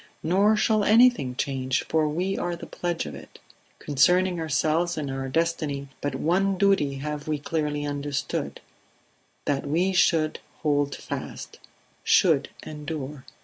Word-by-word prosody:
Nor 195 Hz, +6 st, +3 dB
shall 215 Hz, -1 st, +2 dB
anything 225 Hz, -, +4 dB
change, 130 Hz, -1 st, -1 dB
for 155 Hz, -1 st, +2 dB
we 180 Hz, +6 st, -1 dB
are 175 Hz, 0 st, -2 dB
the 170 Hz, -, -9 dB
pledge 175 Hz, -, -3 dB
of 75 Hz, -, -7 dB
it. 70 Hz, -, -12 dB, 0.4 s
Concerning 175 Hz, +5 st, +2 dB
ourselves 160 Hz, +3 st, 0 dB
and 145 Hz, -3 st, -3 dB
our 135 Hz, 0 st, -4 dB
destiny 150 Hz, -3 st, -1 dB
but 145 Hz, -, -2 dB
one 190 Hz, +4 st, +1 dB
duty 190 Hz, -8 st, +2 dB
have 150 Hz, +2 st, -5 dB
we 155 Hz, -1 st, 0 dB
clearly 145 Hz, 0 st, -2 dB
understood: 145 Hz, 0 st, -3 dB, 0.8 s
that 145 Hz, -1 st, -1 dB
we 175 Hz, +6 st, +1 dB
should 160 Hz, -4 st, +2 dB, 0.2 s
hold 145 Hz, -2 st, +1 dB
fast -, -, -7 dB, 0.4 s
should -, -, +4 dB, 0.2 s
endure. 150 Hz, -2 st, -6 dB
155 Hz, 135 wpm, -25 LUFS, 140-175 Hz, 0.8 s, anything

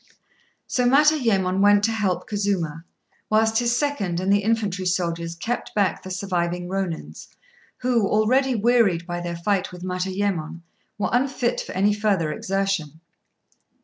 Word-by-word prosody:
So 250 Hz, -, 0 dB
Matayémon 245 Hz, -10 st, +3 dB
went 205 Hz, 0 st, +5 dB
to 225 Hz, -, +2 dB
help 205 Hz, -5 st, -1 dB
Kazuma, 185 Hz, -6 st, -2 dB, 0.4 s
whilst 220 Hz, +1 st, +3 dB
his 240 Hz, 0 st, +1 dB
second 215 Hz, -, -1 dB
and 190 Hz, +2 st, +2 dB
the 200 Hz, -, +4 dB
infantry 205 Hz, -4 st, -1 dB
soldiers 170 Hz, -2 st, -1 dB
kept 230 Hz, +8 st, -4 dB
back 200 Hz, -3 st, +1 dB
the 185 Hz, -, -9 dB
surviving 180 Hz, -2 st, -2 dB
Rônins, 185 Hz, -3 st, -4 dB, 0.5 s
who, 240 Hz, -5 st, +2 dB
already 255 Hz, +6 st, +2 dB
wearied 215 Hz, -6 st, +2 dB
by 175 Hz, 0 st, -4 dB
their 170 Hz, -1 st, -4 dB
fight 195 Hz, +2 st, -1 dB
with 180 Hz, 0 st, -10 dB
Matayémon, 185 Hz, -2 st, -2 dB, 0.4 s
were 205 Hz, -, -1 dB
unfit 250 Hz, -1 st, 0 dB
for -, -, -8 dB
any 200 Hz, +2 st, +2 dB
further 200 Hz, -7 st, 0 dB
exertion. 185 Hz, -3 st, -2 dB
195 Hz, 140 wpm, -23 LUFS, 180-225 Hz, 0.5 s, went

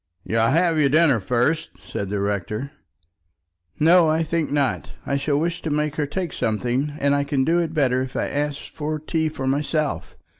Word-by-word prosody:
"You'll 115 Hz, 0 st, +1 dB
have 165 Hz, +4 st, +2 dB
your 140 Hz, -2 st, +4 dB
dinner 150 Hz, -4 st, +4 dB
first?" 125 Hz, +10 st, 0 dB, 0.2 s
said 100 Hz, -, -4 dB
the 100 Hz, 0 st, -1 dB
rector. 105 Hz, +6 st, -2 dB, 1.1 s
"No, 165 Hz, +1 st, +6 dB
I 160 Hz, +1 st, +2 dB
think 165 Hz, 0 st, -1 dB
not. 140 Hz, -2 st, -1 dB
I 140 Hz, -, -1 dB
shall 140 Hz, +1 st, 0 dB
wish 165 Hz, +3 st, -1 dB
to 160 Hz, -, -3 dB
make 150 Hz, 0 st, -1 dB
her 150 Hz, -2 st, 0 dB
take 175 Hz, +1 st, -3 dB
something, 125 Hz, +6 st, -1 dB
and 140 Hz, -1 st, +2 dB
I 145 Hz, 0 st, +2 dB
can 140 Hz, -2 st, 0 dB
do 170 Hz, +3 st, +3 dB
it 165 Hz, -1 st, -2 dB
better 130 Hz, -4 st, +2 dB
if 130 Hz, 0 st, -5 dB
I -, -, 0 dB
ask 145 Hz, 0 st, -2 dB
for 155 Hz, 0 st, -3 dB
tea 160 Hz, +1 st, -1 dB
for 135 Hz, -3 st, -5 dB
myself. 145 Hz, +2 st, -1 dB
145 Hz, 190 wpm, -23 LUFS, 130-160 Hz, 1.1 s, No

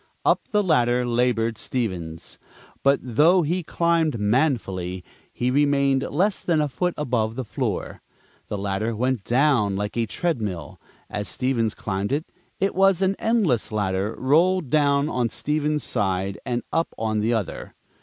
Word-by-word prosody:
Up -, -, +2 dB
the 210 Hz, -1 st, +2 dB
ladder 125 Hz, -8 st, +2 dB
labored 115 Hz, -2 st, +1 dB
Stevens, 90 Hz, -10 st, -4 dB, 0.4 s
but, 140 Hz, 0 st, +4 dB
though 155 Hz, +9 st, +4 dB
he 175 Hz, +5 st, 0 dB
climbed 165 Hz, -4 st, +1 dB
manfully, 105 Hz, -, 0 dB, 0.3 s
he 125 Hz, +1 st, -1 dB
remained 140 Hz, -1 st, +3 dB
less 190 Hz, +7 st, +1 dB
than 165 Hz, -3 st, +1 dB
a 150 Hz, -, +2 dB
foot 180 Hz, +6 st, -2 dB
above 115 Hz, -6 st, -1 dB
the 130 Hz, 0 st, -4 dB
floor. -, -, -3 dB, 0.5 s
The 105 Hz, -, -3 dB
ladder 100 Hz, +3 st, -2 dB
went 125 Hz, -1 st, 0 dB
down 120 Hz, -5 st, +2 dB
like 105 Hz, +1 st, -3 dB
a 115 Hz, -1 st, 0 dB
treadmill, 105 Hz, -, -3 dB, 0.3 s
as 105 Hz, 0 st, -4 dB
Stevens 120 Hz, -4 st, -1 dB
climbed 100 Hz, +1 st, -3 dB
it 160 Hz, +6 st, -3 dB
was 195 Hz, 0 st, +3 dB
an 190 Hz, +1 st, +2 dB
endless 205 Hz, -, +1 dB
ladder 100 Hz, 0 st, -1 dB
rolled 160 Hz, +2 st, +2 dB
down 145 Hz, -1 st, +3 dB
on 125 Hz, -6 st, 0 dB
Stevens' 150 Hz, +3 st, -1 dB
side 95 Hz, -2 st, -1 dB
and 120 Hz, -1 st, -1 dB
up 165 Hz, 0 st, 0 dB
on 110 Hz, -1 st, -1 dB
the 110 Hz, +3 st, +1 dB
other. 110 Hz, -5 st, -4 dB
125 Hz, 145 wpm, -24 LUFS, 105-155 Hz, 0.5 s, but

